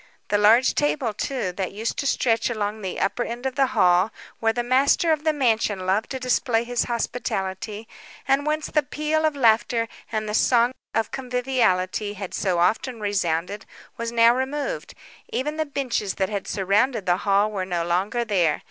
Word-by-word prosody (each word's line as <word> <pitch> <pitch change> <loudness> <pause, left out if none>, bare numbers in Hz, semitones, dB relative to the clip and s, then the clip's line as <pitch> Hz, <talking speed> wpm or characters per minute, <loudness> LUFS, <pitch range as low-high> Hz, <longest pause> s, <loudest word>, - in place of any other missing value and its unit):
The 205 - +2
large 225 +5 +5
table, 280 -6 0
too, 245 -3 -2
that 185 0 -4
used 220 +3 -3
to 280 - -1
stretch 230 -3 +1
along 215 -1 -3
the 190 -2 -4
upper 240 - 0
end 240 +2 -6
of 265 - -1
the 270 0 +2
hall, 180 +3 +4 0.3
where 225 0 +2
the 240 +2 -2
master 270 +6 +3
of 305 -1 0
the 315 - +3
mansion 225 -9 0
loved 195 +4 0
to 265 - -4
display 245 -2 +1
his 245 0 -1
hospitality, 215 -3 -3 0.4
and 270 +1 +3
whence 305 +1 -1
the 300 - +1
peal 305 +3 -1
of 310 -2 +1
laughter, 230 -2 +2 0.2
and 215 -1 -2
the 210 - -3
song 240 +2 +3 0.2
of 225 -1 0
conviviality 245 -7 0
had 195 -2 -7
so 185 -3 0
often 225 +7 +1
resounded, 200 -1 -2 0.3
was 230 0 -4
now 230 0 +5
removed; 285 - -3 0.3
even 300 +4 -2
the 315 -1 -1
benches 255 -8 -2
that 190 -1 -1
had 200 -2 -4
surrounded 205 +3 +1
the 175 -1 +2
hall 200 +2 +2
were 195 -3 -2
no 175 -2 -2
longer 195 +8 0
there. 180 -8 +1
225 Hz, 180 wpm, -24 LUFS, 200-260 Hz, 0.4 s, large